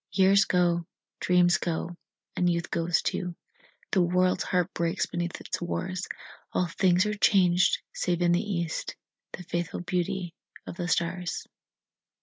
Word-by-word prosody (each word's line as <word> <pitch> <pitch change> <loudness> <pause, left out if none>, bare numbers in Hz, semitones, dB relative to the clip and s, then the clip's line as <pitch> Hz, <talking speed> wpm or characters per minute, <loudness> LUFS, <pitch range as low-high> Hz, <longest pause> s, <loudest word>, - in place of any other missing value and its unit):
Years 195 0 +5
go, 175 -2 +1 0.3
dreams 175 -1 +4
go, 170 +1 -3 0.4
and 180 - +2
youth 170 0 -1
goes 170 0 +1
too, 180 -2 -2 0.6
The 190 - +3
world's 180 +1 +2
heart 180 0 0
breaks 170 +2 0
beneath 175 0 -4
its - - -4
wars, 185 +2 -3 0.5
All 180 - +2
things 180 +2 +2
are 210 - 0
changed, 190 -3 +3
save 175 -1 0
in 175 - +4
the 175 +1 +3
east 170 -6 -3 0.4
The 180 - -7
faithful 175 0 -3
beauty 180 0 -2 0.3
of - - -7
the 175 - -2
stars. 175 0 -1
175 Hz, 140 wpm, -27 LUFS, 170-185 Hz, 0.6 s, Years